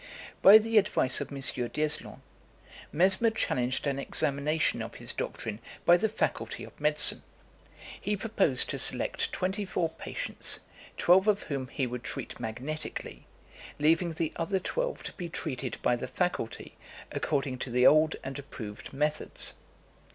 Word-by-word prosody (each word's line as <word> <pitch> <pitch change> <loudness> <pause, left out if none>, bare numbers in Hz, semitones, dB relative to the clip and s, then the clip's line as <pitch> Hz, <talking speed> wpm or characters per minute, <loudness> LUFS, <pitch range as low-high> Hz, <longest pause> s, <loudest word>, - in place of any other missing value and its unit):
By 200 +3 +10
the 220 0 +4
advice 190 -10 +2
of - - -5
M. 140 - -6
D'Eslon, 135 +4 -1 0.7
Mesmer 190 +7 +5
challenged 130 - -1
an 140 -1 -1
examination 150 +2 0
of - - -7
his - - -4
doctrine 110 -1 -4 0.3
by 175 - +7
the 215 +5 +1
Faculty 220 - -2
of - - -13
Medicine. - - +3 0.8
He 210 0 -1
proposed 195 - +3
to - - -3
select - - +2
twenty 190 +3 -2
four 180 -3 -1
patients, - - -2 0.4
twelve 190 +3 +4
of 210 -1 +2
whom 135 -4 -4
he 135 0 -2
would 125 0 -5
treat - - -5
magnetically, 125 +7 -5 0.5
leaving 165 +3 +2
the 160 0 -2
other 185 +4 0
twelve - - -3
to - - -4
be 175 -3 -6
treated 130 -7 -4
by 125 - +3
the 120 - -5
faculty 180 -10 -3 0.4
according 135 -4 -2
to 130 - -3
the 125 +1 +2
old 155 +1 +5
and 135 +1 -5
approved 110 -7 -8
methods. 150 +2 0
155 Hz, 145 wpm, -29 LUFS, 130-185 Hz, 0.8 s, By